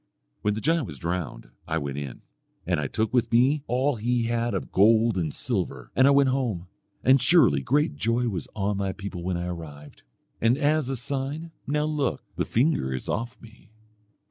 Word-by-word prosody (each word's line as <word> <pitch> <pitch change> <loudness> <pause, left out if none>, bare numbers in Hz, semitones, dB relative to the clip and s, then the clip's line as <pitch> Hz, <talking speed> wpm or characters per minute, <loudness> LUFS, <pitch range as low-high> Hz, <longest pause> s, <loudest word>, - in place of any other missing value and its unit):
"When 105 0 +1
the 110 - -4
giant 160 -2 +1
was 75 - -8
drowned 85 -5 -4 0.2
I 80 0 0
went 70 -2 -3
in, 70 -4 -7 0.4
and 90 -2 0
I 70 - -1
took 110 - -1
with 120 -2 +2
me 130 +6 +4
all 130 +2 +1
he 120 +2 0
had 120 0 -1
of - - -4
gold 110 +2 +4
and 85 -5 -1
silver, - - -3
and 130 +2 +5
I - - +6
went 140 -1 +5
home, 120 -10 -1 0.4
and 130 0 +5
surely 125 - +5
great 135 - +1
joy 115 +8 +1
was 95 -7 -3
on 100 -1 -1
my 100 -1 -1
people 100 -2 -6
when 90 0 -2
I 85 - -3
arrived. 75 -4 -8 0.4
And 115 +3 +3
as 150 -2 +1
a 135 - -1
sign 140 +6 -4 0.2
now 150 +2 +1
look, 150 -4 -1
the - - -1
finger 125 - +1
is 65 - -6
off 115 +1 -3
me." 115 0 -17
115 Hz, 195 wpm, -26 LUFS, 90-135 Hz, 0.4 s, I